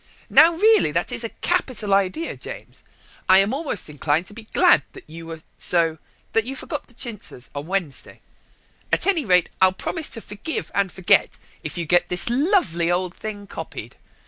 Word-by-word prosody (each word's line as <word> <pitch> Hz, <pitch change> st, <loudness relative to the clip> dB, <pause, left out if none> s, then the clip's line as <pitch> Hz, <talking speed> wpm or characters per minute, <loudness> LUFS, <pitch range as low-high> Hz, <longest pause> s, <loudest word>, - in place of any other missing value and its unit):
"Now, 330 Hz, +2 st, +7 dB
really, 435 Hz, +5 st, +4 dB
that -, -, 0 dB
is -, -, -1 dB
a -, -, -3 dB
capital 210 Hz, -6 st, -1 dB
idea, 195 Hz, -, 0 dB
James. -, -, -9 dB, 0.5 s
I 185 Hz, -, +8 dB
am 195 Hz, +5 st, +3 dB
almost 280 Hz, -, -3 dB
inclined 150 Hz, +2 st, 0 dB
to 205 Hz, -, -12 dB
be 220 Hz, 0 st, -11 dB
glad -, -, +5 dB
that -, -, -13 dB
you 165 Hz, +1 st, -10 dB
were 165 Hz, -1 st, -8 dB, 0.2 s
so 165 Hz, -2 st, +2 dB, 0.3 s
that 225 Hz, -, +3 dB
you 260 Hz, +4 st, -5 dB
forgot 295 Hz, +2 st, -5 dB
the 240 Hz, -, -21 dB
chintzes 215 Hz, -, -6 dB
on 145 Hz, +2 st, -6 dB
Monday. 180 Hz, -7 st, -3 dB, 0.7 s
At -, -, +2 dB
any 345 Hz, -8 st, +2 dB
rate, 180 Hz, -3 st, +4 dB
I'll 185 Hz, 0 st, +7 dB
promise 315 Hz, -, -2 dB
to 230 Hz, -, -6 dB
forgive 215 Hz, +12 st, -5 dB
and 195 Hz, -2 st, +1 dB
forget 190 Hz, -2 st, +3 dB, 0.3 s
if -, -, -5 dB
you 170 Hz, -, -2 dB
get 175 Hz, +3 st, +2 dB
this 180 Hz, +6 st, -2 dB
lovely 245 Hz, -, +2 dB
old 180 Hz, 0 st, 0 dB
thing 205 Hz, -2 st, -7 dB
copied. -, -, -8 dB
195 Hz, 180 wpm, -23 LUFS, 175-255 Hz, 0.7 s, I